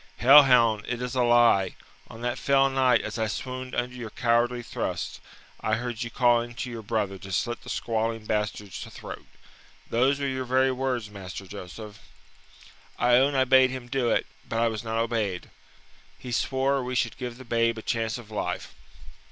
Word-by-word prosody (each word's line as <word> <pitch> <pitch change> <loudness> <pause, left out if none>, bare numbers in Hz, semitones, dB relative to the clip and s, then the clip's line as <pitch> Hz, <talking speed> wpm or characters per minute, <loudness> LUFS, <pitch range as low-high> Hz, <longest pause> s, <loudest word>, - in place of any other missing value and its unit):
"Hell 140 +4 +9
hound, 115 -6 +4
it 125 -1 -3
is 125 0 -4
a 130 - +1
lie! 120 -6 +4 0.3
On 115 - -11
that 120 0 -2
fell 135 -1 +4
night, 130 -3 +3
as - - -5
I 110 - +1
swooned 130 +3 -5
under 125 +1 -2
your 120 -3 -6
cowardly 120 +1 +1
thrust, - - -4 0.4
I 110 - 0
heard 120 0 -4
you 120 - -3
calling 120 -1 +2
to 125 +1 -5
your 115 -1 -6
brother 100 -3 -2
to 95 - -9
slit 120 +6 -1
the - - -11
squalling 115 -1 -2
bastard's 105 -3 -3
throat. - - -9 0.6
Those 130 +4 +2
were 140 - -1
your 130 -1 -2
very 130 +1 +3
words, 125 -4 -2
Master 95 -1 -8
Joseph." 105 +2 -9 1.0
"I 120 0 +4
own 140 +2 +3
I 130 - +4
bade 130 0 +6
him 130 -1 -6
do 130 -3 0
it, - - +1 0.2
but 115 - -2
I 115 0 +3
was 110 0 -5
not 115 0 -3
obeyed. 110 -6 -2 0.7
He 125 - -8
swore 135 +2 +1
we 125 +1 -4
should 115 -2 0
give 125 -2 -6
the 130 - -11
babe 115 0 +1
a 110 - -7
chance 115 -1 -1
of 115 -3 -12
life. 105 - -4
120 Hz, 185 wpm, -26 LUFS, 110-130 Hz, 1.0 s, Hell